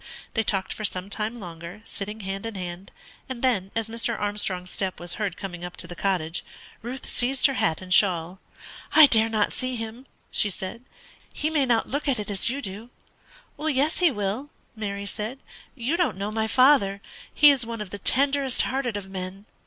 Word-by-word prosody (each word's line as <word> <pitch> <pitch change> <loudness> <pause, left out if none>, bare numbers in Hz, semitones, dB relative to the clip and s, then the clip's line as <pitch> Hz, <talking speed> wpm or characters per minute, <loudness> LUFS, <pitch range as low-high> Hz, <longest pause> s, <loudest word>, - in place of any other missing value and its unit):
They 225 - +2
talked 195 -3 0
for 215 - -7
some 190 -1 -2
time 215 +3 -2
longer, 175 +1 -9
sitting 210 +2 -6
hand 195 +2 -4
in 225 - -6
hand; 180 0 -6 0.4
and 260 -2 -5
then, 210 -8 +2
as 225 -1 0
Mr. 230 0 -2
Armstrong's 200 -3 -1
step 190 -4 -3
was 175 0 -2
heard 195 -4 -1
coming 175 -3 -6
up 175 0 -7
to - - 0
the 175 +1 -8
cottage, 175 -4 -1 0.4
Ruth 245 +3 -6
seized 260 +2 +2
her 275 - +5
hat 160 -10 +1
and 185 0 0
shawl. 180 -2 +4 0.5
"I 315 - +11
dare 225 -4 +4
not 215 -2 +1
see 255 0 -2
him," 230 +3 -6 0.2
she 210 - +3
said; 190 +4 -6 0.5
"he 310 - -1
may 290 -4 +2
not 230 -2 +2
look 285 +3 -2
at 270 -3 +2
it 210 -1 -4
as 200 +3 0
you 280 +3 -3
do." 205 +5 -7 0.7
"Yes, 300 0 +1
he 355 -2 +6
will," 210 +4 -2 0.3
Mary 200 -2 -4
said. 215 +6 -4 0.4
"You 265 +6 -1
don't 325 - +1
know 200 +2 -3
my 220 0 0
father; 255 -6 +5 0.3
he 295 -1 +8
is 270 -3 +1
one 230 0 -5
of 210 -3 -6
the 205 - -6
tenderest 275 +3 +4
hearted 255 -4 -1
of 195 -2 -7
men." 190 +1 -6
215 Hz, 195 wpm, -26 LUFS, 190-255 Hz, 0.7 s, I